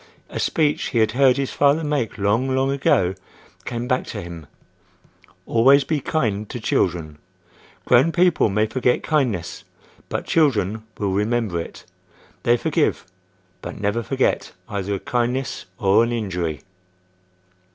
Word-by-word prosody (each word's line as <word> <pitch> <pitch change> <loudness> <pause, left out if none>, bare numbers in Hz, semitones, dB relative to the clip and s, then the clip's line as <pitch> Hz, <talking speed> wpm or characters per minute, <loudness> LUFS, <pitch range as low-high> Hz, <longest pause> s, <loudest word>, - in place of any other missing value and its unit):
A - - -5
speech 150 -2 +1
he 120 - -3
had 110 -1 +3
heard 130 +1 +4
his 135 -1 -2
father 145 +3 +3
make 145 -6 -1
long, 105 +6 +1
long 130 +1 +1
ago, 95 -9 +2 0.5
came 120 0 -4
back 125 0 0
to - - -5
him: 85 -3 -9 1.0
"Always 135 +5 +5
be 155 +1 -1
kind 110 -8 -1
to 120 - -5
children. 80 -8 -1 0.7
Grown 125 +7 +4
people 175 -7 +3
may 105 +2 +1
forget 125 +3 0
kindness, 125 - -1 0.5
but - - -3
children 110 - +1 0.2
will 100 -2 -1
remember 105 -3 0
it. - - -10 0.6
They 120 0 +3
forgive, - - 0 0.6
but - - -7
never 105 +3 0
forget 130 +3 -1
either 100 0 -3
a - - -4
kindness 125 +4 -2
or 100 +3 +4
an 115 - -1
injury." 90 -9 -3
115 Hz, 140 wpm, -22 LUFS, 100-135 Hz, 1.0 s, Always